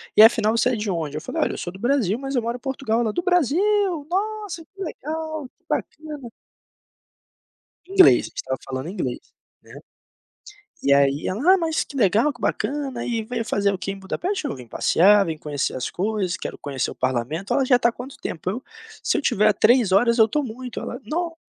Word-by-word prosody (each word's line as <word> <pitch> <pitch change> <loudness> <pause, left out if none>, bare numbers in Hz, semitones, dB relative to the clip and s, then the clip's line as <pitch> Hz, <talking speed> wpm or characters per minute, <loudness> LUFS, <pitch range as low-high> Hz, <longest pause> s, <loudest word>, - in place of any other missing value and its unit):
e - - +8
afinal 220 0 +6
você 230 - +3
é 250 - 0
de 210 -1 -3
onde?" 160 -5 -2
Eu - - -4
falei: - - -3
"Olha, - - -1
eu - - -6
sou 175 - -5
do 190 - -11
Brasil 240 -4 +1
mas 270 0 -4
eu 245 - +2
moro 235 +2 -3
em - - -20
Portugal." 265 -3 -1
Ela: 220 -3 0
"Do 350 - -2
Brasil, 360 - +2
nossa 405 -2 -3
que 390 +3 -15
legal, 315 -2 -5
que - - -45
bacana." 300 -5 -4 1.6
Inglês, 380 -1 +6
a - - -8
gente - - -29
estava 130 0 -3
falando 130 +3 -4
inglês, 130 -11 -3 0.4
né. - - -16 1.1
E 140 - +4
aí 140 +1 +2
ela: 275 - +3
"Ah, - - +2
mas 325 -2 0
que - - -14
legal, 225 +5 +3
que 240 - -18
bacana, 275 -4 -2
e 230 -2 -1
veio 230 +1 -3
fazer 200 -2 +1
o - - -2
que 195 - -4
em 195 - -9
Budapeste?" 345 - -3
"Eu 285 - -3
vim 125 -2 -11
passear, 200 - +4
vim 160 -1 -3
conhecer 145 -3 -3
as 130 - -3
coisas, 195 -2 -1
quero - - -6
conhecer 140 -3 -3
o - - -9
parlamento." 130 +8 -2
Ela: 270 - +3
"Já 250 - +6
está 240 -1 +3
há - - -16
quanto 255 +3 -9
tempo?" 170 +1 -5
Eu: 240 +7 -5 0.4
"Se - - +1
eu - - 0
tiver 215 -6 +2
a 215 - +6
três 225 -2 +4
horas, 235 +4 +4
eu 220 - +8
estou 295 +7 0
muito." 250 -1 -6
Ela: 245 - -5
"Nossa, 335 +7 -3
235 Hz, 220 wpm, -23 LUFS, 190-295 Hz, 1.6 s, e